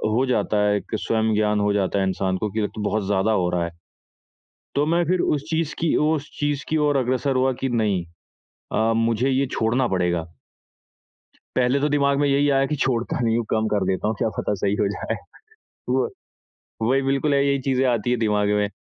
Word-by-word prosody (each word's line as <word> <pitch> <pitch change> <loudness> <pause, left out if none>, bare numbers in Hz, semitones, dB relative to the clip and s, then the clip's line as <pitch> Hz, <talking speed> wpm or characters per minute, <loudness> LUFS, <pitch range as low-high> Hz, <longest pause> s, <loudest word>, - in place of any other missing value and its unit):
हो 130 +3 +2
जाता 110 -3 +1
है 105 - +3
एक 105 - -5
स्वयं 110 -1 0
ज्ञान 105 0 +2
हो 105 0 +2
जाता 100 0 0
है 95 - +1
इंसान 95 0 -1
को 105 +2 -2
कि 110 - -2
अब 105 - -1
तो 110 - -5
बहुत 110 -2 -1
ज़्यादा 100 +2 +1
हो 90 -5 +1
रहा 90 -1 0
है। 85 - -6 1.0
तो 145 - +2
मैं 170 +3 +2
फिर 180 +3 +1
उस 145 -2 0
चीज़ 160 -1 -1
की 165 -1 +1
उस 155 -2 -1
चीज़ 145 -1 -1
की 155 - +1
ओर 145 -1 +2
अग्रसर 130 +2 0
हुआ 130 +1 +3
कि 135 - 0
नहीं 105 -7 0 0.7
अ, 110 +1 +2
मुझे 115 +3 +1
ये 135 +1 +2
छोड़ना 120 +3 +1
पड़ेगा। 90 -4 0 1.3
पहले 130 +2 +2
तो 150 - +2
दिमाग 140 -1 +2
में 145 - +3
यही 140 +1 +3
आया 135 0 +3
कि 150 - -2
छोड़ता 125 -3 -1
नहीं 115 -1 +2
हूँ, 120 - 0
कम 110 0 +1
कर 100 -2 +1
देता 95 +2 0
हूँ, 110 - 0
क्या - - +1
पता - - 0
सही 100 0 +2
हो 100 - +2
जाए? 105 - -3 0.7
हुआ, - - +2 0.8
वही 135 +2 +3
बिल्कुल 135 +2 +1
यही 140 0 +2
चीजें 135 0 +2
आती 120 0 0
है 125 - +2
दिमाग 105 -2 +1
में। 105 0 +1
120 Hz, 210 wpm, -23 LUFS, 105-140 Hz, 1.3 s, है